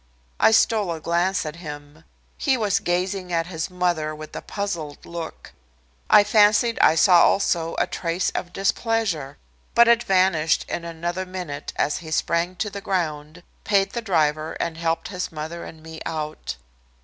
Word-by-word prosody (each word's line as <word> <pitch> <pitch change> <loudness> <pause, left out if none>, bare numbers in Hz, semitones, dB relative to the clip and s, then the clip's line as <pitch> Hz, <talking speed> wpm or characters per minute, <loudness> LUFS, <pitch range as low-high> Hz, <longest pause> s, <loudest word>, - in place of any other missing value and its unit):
I - - +6
stole 220 -4 +3
a 165 - -4
glance 175 +3 0
at 155 +1 -6
him. 150 -1 -10 0.3
He 270 -3 +1
was 205 -4 +1
gazing 180 +1 -2
at 165 -1 +1
his 165 -1 -4
mother 175 -4 -1
with 155 0 -10
a - - -4
puzzled 170 -8 -5
look. 170 -1 -7 0.6
I 205 - +8
fancied 210 +3 +4
I 155 - +5
saw 175 +1 +6
also 170 -4 +2
a - - +2
trace 170 +1 -2
of 175 - -4
displeasure. 195 - -1 0.4
But 235 0 +7
it 235 0 +5
vanished 185 -6 +2
in 170 - -4
another 175 +3 -4
minute 180 -6 -6
as 150 - 0
he 160 - -9
sprang 170 +3 0
to 210 +3 -3
the 200 0 -6
ground, 160 -3 -3 0.2
paid 195 -2 +2
the 235 - -3
driver 155 -6 0
and 165 -1 -3
helped 165 0 -2
his 180 -2 -4
mother 160 +2 -6
and 160 -1 -11
me 160 0 -10
out. 155 - -4
170 Hz, 165 wpm, -23 LUFS, 160-195 Hz, 0.6 s, I